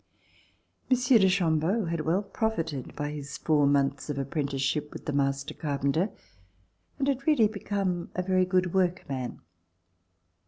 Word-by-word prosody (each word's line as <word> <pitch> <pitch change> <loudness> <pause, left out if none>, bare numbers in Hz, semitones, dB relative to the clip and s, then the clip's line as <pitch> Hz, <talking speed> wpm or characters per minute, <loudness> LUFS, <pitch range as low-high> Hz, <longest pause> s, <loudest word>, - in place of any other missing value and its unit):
Monsieur 250 -2 +5
de 190 -1 +5
Chambeau 180 +3 +1
had 165 -1 -2
well 175 +6 +1
profited 165 - -3
by 150 0 -3
his 145 -2 -6
four 150 -3 +3
months 140 0 +1
of 145 - -2
apprenticeship 140 +1 -1
with - - -9
the 150 - -2
master 140 0 0
carpenter 145 +5 0 0.9
and 275 -1 0
had 275 0 -1
really 290 -9 +5
become 195 -4 -2
a 185 - -1
very 185 0 +2
good 180 -1 +1
work 180 -2 +1
man. 130 -3 -4
165 Hz, 145 wpm, -28 LUFS, 140-195 Hz, 0.9 s, Monsieur